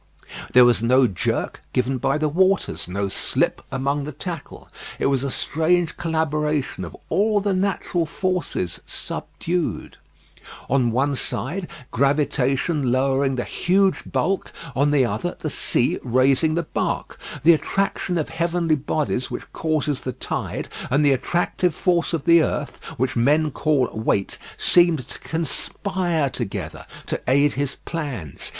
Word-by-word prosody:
There 125 0 +8
was 120 -3 +4
no 130 +3 +4
jerk 95 -7 -2
given 130 +1 0
by 135 +4 +1
the 155 0 +1
waters, 185 - +1
no 100 +2 -2
slip - - +1
among 140 +2 -1
the 150 - -5
tackle. 165 +1 -7 0.3
It - - -1
was 135 -1 +2
a 140 - -1
strange 160 +5 +1
collaboration 150 - -1
of 85 -2 -8
all 210 +1 +2
the 200 -1 0
natural 185 -3 0
forces 180 - -2
subdued. 175 -1 -3 0.7
On 125 -2 +2
one 135 +5 +1
side, 170 +7 -2 0.2
gravitation 140 +1 +1
lowering 135 +1 +2
the 120 - -1
huge 190 +2 +1
bulk, 195 +1 0 0.2
on 140 +2 +3
the 145 -3 +4
other 120 +11 -3
the 155 - -3
sea 125 - +1
raising 135 +5 +3
the 170 - 0
bark. - - -3 0.2
The 170 +2 +8
attraction 180 +1 -1
of 155 - -1
heavenly 170 -1 +1
bodies 140 -2 -1
which 120 - -7
causes 155 -3 -1
the 130 - -4
tide, - - -4 0.2
and 145 +4 +3
the 145 - +5
attractive 175 +5 0
force 175 -2 +1
of 165 -5 -1
the 170 0 +7
earth, 150 -1 -3
which 130 +2 0
men 150 +6 +3
call 145 -3 +1
weight, 110 -3 -1 0.2
seemed 170 -7 +3
to - - -8
conspire 165 0 -1
together 115 -6 -5 0.2
to - - -3
aid 140 +2 +4
his 140 0 -2
plans. 135 - -5
150 Hz, 145 wpm, -23 LUFS, 130-170 Hz, 0.7 s, There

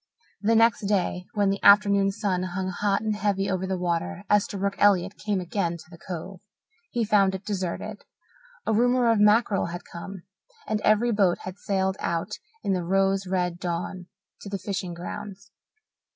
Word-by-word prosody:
The 225 +2 +3
next 225 -2 +3
day, 180 -2 0
when 200 -2 +2
the 200 - -3
afternoon 200 -1 +6
sun 195 -3 -1
hung 185 +1 -3
hot 200 +2 0
and 215 -1 -1
heavy 200 -1 0
over 190 0 -1
the 190 0 -1
water, 170 - -2
Esterbrook 200 -1 +1
Elliott 195 -1 +3
came 205 -2 -2
again 175 -1 -2
to 160 - -15
the 170 - -11
Cove. 180 +1 -7 0.5
He 240 -6 -1
found 195 -2 +3
it 190 - -8
deserted. 190 -4 -4 0.6
A - - +1
rumour 245 +1 +3
of 225 - +2
mackerel 210 -2 +3
had 175 +1 -6
come, 180 +1 -9 0.4
and 215 -1 -1
every 215 +3 +3
boat 195 -5 +3
had 185 +2 -7
sailed 190 -1 -1
out 170 +5 -2 0.2
in 195 - +1
the 180 -2 -1
rose 195 +2 +1
red 180 -2 -1
dawn 180 +1 -4 0.3
to 200 - -8
the 195 - -2
fishing 185 -2 -4
grounds. 200 +2 -8
195 Hz, 170 wpm, -26 LUFS, 180-205 Hz, 0.6 s, afternoon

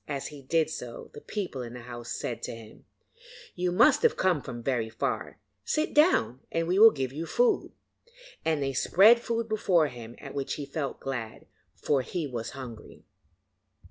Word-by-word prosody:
As 140 -2 -4
he 145 -2 -11
did 160 +3 +1
so 125 -6 -7
the - - -10
people 185 -11 -4
in 120 -1 -7
the 125 - -8
house 120 -1 -8
said 120 0 -4
to - - -5
him: 115 -1 -14 0.7
'You 180 0 -1
must 220 +8 +5
have 470 - +3
come 180 -6 +2
from 120 -2 -7 0.3
far; 125 -5 -2 0.3
sit 310 - -1
down, 300 - +4
and 165 0 0
we 185 +3 +2
will 225 +1 +11
give 135 - -3
you 160 +3 -5
food,' 485 -3 +1 0.7
and 155 -3 +1
they 135 0 -1
spread 205 - +6
food 230 -1 -2
before 185 -8 +2
him, 120 -2 -10
at - - -9
which 140 -1 -3
he 145 - -5
felt 140 0 -4
glad, 120 -5 -5 0.3
for 140 -3 +1
he 165 +5 -3
was 120 -5 -4
hungry. 120 -4 -10
145 Hz, 175 wpm, -28 LUFS, 125-185 Hz, 0.7 s, will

